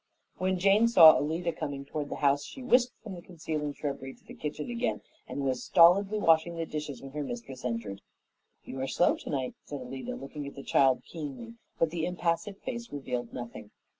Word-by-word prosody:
When 185 Hz, 0 st, +1 dB
Jane 200 Hz, +5 st, +5 dB
saw 170 Hz, -9 st, +9 dB
Alida 165 Hz, +3 st, -1 dB
coming 140 Hz, -3 st, -5 dB
toward 145 Hz, 0 st, -4 dB
the -, -, -4 dB
house 140 Hz, +1 st, +3 dB
she 265 Hz, -, -9 dB
whisked 250 Hz, 0 st, +3 dB
from 210 Hz, -4 st, -7 dB
the 175 Hz, -, -8 dB
concealing 155 Hz, -4 st, -4 dB
shrubbery 135 Hz, -2 st, -5 dB
to -, -, -28 dB
the -, -, -11 dB
kitchen 150 Hz, 0 st, -5 dB
again 240 Hz, +1 st, -1 dB, 0.3 s
and 140 Hz, -, -4 dB
was 130 Hz, -2 st, -1 dB
stolidly 195 Hz, +5 st, +5 dB
washing 165 Hz, -3 st, +3 dB
the 165 Hz, 0 st, -2 dB
dishes 150 Hz, -5 st, -5 dB
when 135 Hz, -, -8 dB
her 150 Hz, +1 st, -4 dB
mistress 145 Hz, -, -7 dB
entered. 115 Hz, -5 st, -3 dB, 0.6 s
"You 130 Hz, -, -6 dB
are 135 Hz, -, -1 dB
slow 175 Hz, -, +3 dB
tonight," 130 Hz, -3 st, -3 dB
said 145 Hz, -, -6 dB
Alida, 130 Hz, +1 st, -6 dB
looking 140 Hz, +1 st, -7 dB
at 140 Hz, -, -9 dB
the 140 Hz, -, -8 dB
child 130 Hz, -2 st, +3 dB
keenly, 165 Hz, -, -7 dB, 0.2 s
but 165 Hz, -1 st, +2 dB
the 165 Hz, -1 st, -1 dB
impassive 180 Hz, +3 st, -1 dB
face 235 Hz, -2 st, -5 dB
revealed 125 Hz, -4 st, -4 dB
nothing. 120 Hz, -1 st, -8 dB
155 Hz, 195 wpm, -29 LUFS, 135-180 Hz, 0.6 s, saw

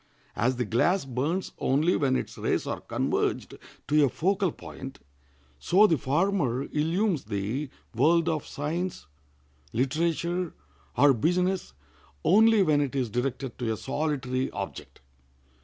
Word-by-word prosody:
As 125 Hz, +6 st, +1 dB
the 125 Hz, 0 st, -1 dB
glass 140 Hz, -, +2 dB
burns 140 Hz, +9 st, -2 dB
only 150 Hz, +7 st, +2 dB
when 135 Hz, -3 st, +1 dB
its -, -, -3 dB
rays -, -, -1 dB
are -, -, -4 dB
converged -, -, -1 dB, 0.3 s
to 150 Hz, +1 st, +4 dB
a 140 Hz, -, +4 dB
focal 190 Hz, -, 0 dB
point, 135 Hz, -1 st, -9 dB, 0.6 s
so 195 Hz, +4 st, +5 dB
the 170 Hz, -, +4 dB
former 140 Hz, -2 st, 0 dB
illumes 165 Hz, -, 0 dB
the 110 Hz, +7 st, -3 dB, 0.2 s
world 165 Hz, +8 st, +3 dB
of 155 Hz, -3 st, -1 dB
science, 165 Hz, -, -3 dB, 0.7 s
literature, 170 Hz, +6 st, -1 dB, 0.4 s
or 145 Hz, -1 st, +6 dB
business 180 Hz, -, 0 dB, 0.5 s
only 220 Hz, +2 st, +5 dB
when 150 Hz, -4 st, +3 dB
it 140 Hz, -1 st, -2 dB
is 125 Hz, -5 st, -1 dB
directed 130 Hz, +1 st, -3 dB
to 120 Hz, -3 st, -1 dB
a 110 Hz, -, -2 dB
solitary 135 Hz, -2 st, -2 dB
object. -, -, -7 dB
150 Hz, 130 wpm, -27 LUFS, 130-175 Hz, 0.7 s, or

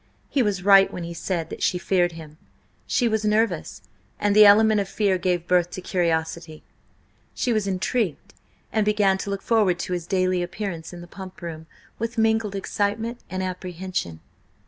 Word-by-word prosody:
He 275 Hz, -, +2 dB
was 200 Hz, -5 st, 0 dB
right 195 Hz, 0 st, +6 dB
when 180 Hz, -, -6 dB
he 170 Hz, 0 st, -6 dB
said 170 Hz, -1 st, -3 dB
that -, -, -7 dB
she 180 Hz, -, +1 dB
feared 175 Hz, -1 st, +1 dB
him; 155 Hz, -1 st, -11 dB, 0.5 s
she 245 Hz, -, +2 dB
was 220 Hz, -1 st, 0 dB
nervous, 210 Hz, -, 0 dB, 0.4 s
and 205 Hz, -1 st, +1 dB
the 210 Hz, -1 st, +9 dB
element 215 Hz, +1 st, +6 dB
of 195 Hz, -, -5 dB
fear 195 Hz, -3 st, +1 dB
gave 180 Hz, -2 st, 0 dB
birth 175 Hz, -1 st, +2 dB
to 180 Hz, -, -7 dB
curiosity. 165 Hz, -3 st, -2 dB, 0.7 s
She 245 Hz, -, 0 dB
was 215 Hz, -2 st, 0 dB
intrigued, 190 Hz, -, -2 dB, 0.4 s
and 220 Hz, -, +2 dB
began 205 Hz, -2 st, +2 dB
to 200 Hz, -, -4 dB
look 200 Hz, 0 st, -4 dB
forward 210 Hz, -6 st, +2 dB
to 180 Hz, -, -4 dB
his 175 Hz, -1 st, -4 dB
daily 185 Hz, -1 st, +1 dB
appearance 175 Hz, -2 st, -5 dB
in 175 Hz, -1 st, -9 dB
the 175 Hz, -, -11 dB
Pump 185 Hz, 0 st, -11 dB
Room 160 Hz, -1 st, -7 dB, 0.3 s
with 230 Hz, +1 st, -4 dB
mingled 220 Hz, -2 st, +1 dB
excitement 210 Hz, +4 st, -2 dB
and 185 Hz, 0 st, -3 dB
apprehension. 180 Hz, -, -4 dB
190 Hz, 175 wpm, -24 LUFS, 175-210 Hz, 0.7 s, the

